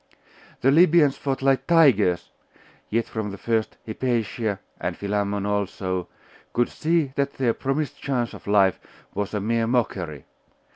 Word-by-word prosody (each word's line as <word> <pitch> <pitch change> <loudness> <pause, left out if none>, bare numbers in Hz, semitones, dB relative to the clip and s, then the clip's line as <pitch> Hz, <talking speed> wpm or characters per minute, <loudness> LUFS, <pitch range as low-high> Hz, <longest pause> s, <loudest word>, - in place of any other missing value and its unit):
The 135 - +4
Libyans 160 -2 +5
fought 135 -1 -3
like 135 -1 +2
tigers; 125 - +4 0.6
yet 115 +1 +1
from 110 -2 -4
the 100 - -7
first, 110 +1 -1
Hypatia, 115 -3 -1 0.2
and - - -3
Philammon 100 0 -1
also, 95 -3 -2 0.5
could 120 0 +2
see 160 -3 0
that 140 0 0
their 125 -4 +1
promised 140 +4 -2
chance 125 -4 -1
of - - -12
life 100 -2 +4 0.3
was 105 +1 -3
a - - 0
mere 115 +2 0
mockery. 95 - -1
115 Hz, 140 wpm, -24 LUFS, 100-135 Hz, 0.6 s, Libyans